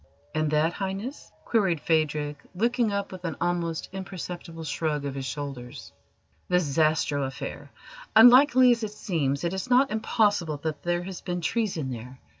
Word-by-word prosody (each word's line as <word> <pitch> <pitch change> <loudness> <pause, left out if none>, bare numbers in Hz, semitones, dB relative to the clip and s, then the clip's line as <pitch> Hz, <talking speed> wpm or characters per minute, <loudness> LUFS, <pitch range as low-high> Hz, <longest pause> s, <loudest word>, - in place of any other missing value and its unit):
"And 155 -1 0
that, 155 +3 +2
Highness?" 195 +9 -5
queried 195 -8 +2
Phadrig, 150 -2 0 0.2
looking 235 +2 +1
up 200 0 -2
with 185 -1 -9
an 165 -4 -3
almost 170 -2 -1
imperceptible 180 -3 -7
shrug 150 -1 -2
of 140 - -3
his 135 -1 -4
shoulders. 135 -5 -6 0.6
"The 180 0 +3
Zastrow 155 -2 +1
affair. 140 +1 -7 0.5
Unlikely 250 +2 +8
as 235 -1 +1
it 215 -1 -4
seems, 150 -9 -1
it 170 +1 -1
is 190 +6 -4
not 255 +1 +4
impossible 205 -7 +1
that 155 -3 -3
there 175 0 -1
has 185 -1 -7
been 180 -1 -3
treason 170 - -1
there. 125 +2 -8
170 Hz, 155 wpm, -26 LUFS, 150-205 Hz, 0.6 s, Unlikely